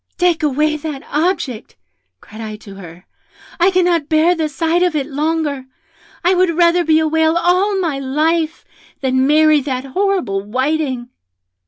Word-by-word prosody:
'Take 355 -2 +1
away 305 +1 +1
that 295 -2 -6
object,' 300 - -2 0.5
cried 215 +2 -12
I 215 -1 -6
to 210 -1 -13
her; 180 -2 -12 0.5
'I 350 +3 +5
cannot 350 -5 +1
bear 320 +2 +3
the 320 -3 -2
sight 325 +4 0
of 355 -3 +1
it 285 -3 0
longer. 295 -1 -2 0.6
I 355 +2 +3
would 360 -3 +1
rather 345 0 +4
be 315 -1 +3
a 315 - +1
whale 320 +1 +2
all 370 +4 +1
my 320 -7 -2
life 315 +4 -1 0.4
than 260 0 +1
marry 305 0 +4
that 260 -1 -4
horrible 315 - -1
Whiting!' 260 +3 -2
310 Hz, 155 wpm, -17 LUFS, 265-340 Hz, 0.6 s, I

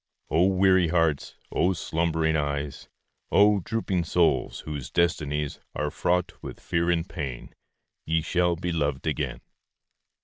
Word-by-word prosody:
O 85 +3 +4
weary 95 -2 +4
hearts! 80 -3 +1 0.2
O 90 +3 +2
slumbering 80 -1 0
eyes! 70 -1 -3 0.4
O 105 0 +5
drooping 95 -2 -1
souls, 85 0 +1
whose 70 -5 -6
destinies 75 -2 0 0.2
Are 75 0 -1
fraught 90 0 0
with - - -8
fear 85 +1 0
and 85 0 +1
pain, 70 -10 -6 0.5
Ye 80 0 +1
shall 90 +1 +1
be 90 +1 -3
loved 70 -4 -1
again! - - -2
85 Hz, 130 wpm, -26 LUFS, 75-90 Hz, 0.5 s, O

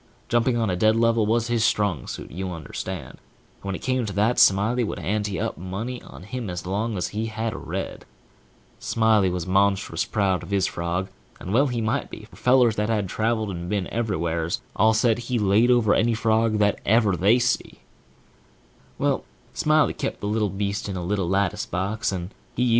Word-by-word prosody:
Jumping 120 0 +2
on 115 -1 +1
a 90 - 0
dead 110 +4 +3
level 115 -1 +3
was 115 +1 +2
his 120 -2 0
strong 105 - +1
suit, - - -7
you 95 +3 -4
understand; 80 -6 -6
and - - -26 0.4
when 100 -1 -3
it - - -8
come 130 -1 +1
to 105 - -3
that, 105 +5 +1
Smiley 105 +6 +4
would 110 - -3
ante 105 -1 -2
up - - -3
money 105 +8 -5
on - - -12
him 115 +1 -5
as 90 0 -5
long 105 +4 -2
as 90 - -2
he 110 +2 -3
had 110 0 -3
a - - -6
red. - - -5 0.8
Smiley 110 -4 +2
was 90 -2 -3
monstrous 100 +1 +1
proud 95 -3 0
of - - -10
his 100 -2 +2
frog, 85 +3 -2 0.3
and 95 - -5
well 135 +5 +4
he 120 -3 -2
might 110 0 -1
be, - - -9
for - - -15
fellers 125 -3 +4
that 105 +1 0
had 105 -4 0
traveled 110 0 0
and 85 -1 -5
been 100 -2 0
everywheres, 85 -7 -1
all 110 +2 +4
said 115 +1 +2
he 120 +1 -2
laid 105 +3 +3
over 120 -4 +4
any 115 +1 +2
frog 110 0 +2
that 105 -1 +2
ever 110 -3 +3
they 100 +7 +4
see. 125 0 -1
110 Hz, 165 wpm, -24 LUFS, 95-115 Hz, 0.8 s, Smiley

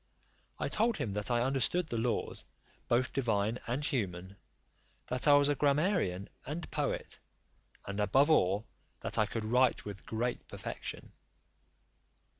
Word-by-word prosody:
I - - -1
told 230 +2 +2
him 105 - -2
that 105 +2 0
I 120 -1 +2
understood 135 +6 +1
the 115 - -2
laws, 120 +1 -1 0.4
both 125 +2 +2
divine 110 -3 +1
and 130 +5 -1
human; 95 - -2 0.7
that 125 +3 -2
I 145 - +8
was 145 0 +6
a 145 - +3
grammarian 140 - +1 0.2
and 155 +5 -5
poet; - - -2 0.7
and 100 +1 -4
above 135 +10 +4
all, 100 -6 +3 0.4
that - - -2
I - - +3
could 110 -1 -3
write 125 +3 +3
with 100 -1 -8
great 120 +2 -2
perfection. - - -7
120 Hz, 140 wpm, -32 LUFS, 105-145 Hz, 0.7 s, I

